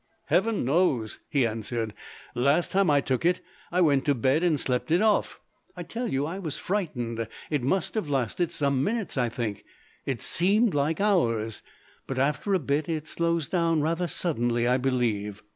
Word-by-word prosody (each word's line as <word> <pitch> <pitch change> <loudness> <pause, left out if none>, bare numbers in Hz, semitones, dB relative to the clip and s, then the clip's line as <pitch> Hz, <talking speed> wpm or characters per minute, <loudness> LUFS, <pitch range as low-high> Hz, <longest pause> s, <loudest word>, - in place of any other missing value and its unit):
"Heaven 210 - +2
knows!" 135 - +1
he 135 -4 +2
answered. 115 0 -3 0.4
"Last 140 +8 +2
time 195 -2 +3
I 145 -1 +4
took 130 0 -1
it 175 +1 +3 0.3
I 180 +1 +2
went 145 -5 +4
to 145 - +3
bed 130 +6 +2
and 165 -5 +2
slept 125 +2 -1
it 170 +3 +4
off. 215 0 +2 0.4
I 175 - -4
tell 230 +8 -4
you, 135 +2 0
I 175 +5 -4
was 160 -7 -4
frightened. 120 - -2 0.2
It 150 -3 +1
must 165 +9 0
have 215 -9 -2
lasted 140 +5 0
some 140 -2 0
minutes, 220 +1 -2
I 125 -3 +1
think 110 -3 -4 0.4
it 130 -4 -1
seemed 205 +5 +2
like 145 +2 0
hours. 115 - +1 0.5
But 135 - -4
after 150 +9 +1
a - - +5
bit 145 0 -1
it 155 -2 -2
slows 170 -1 -1
down 165 -3 +1
rather 165 +3 0
suddenly, 120 -9 0
I 125 +1 +3
believe." 115 -6 -1
145 Hz, 175 wpm, -27 LUFS, 125-175 Hz, 0.5 s, a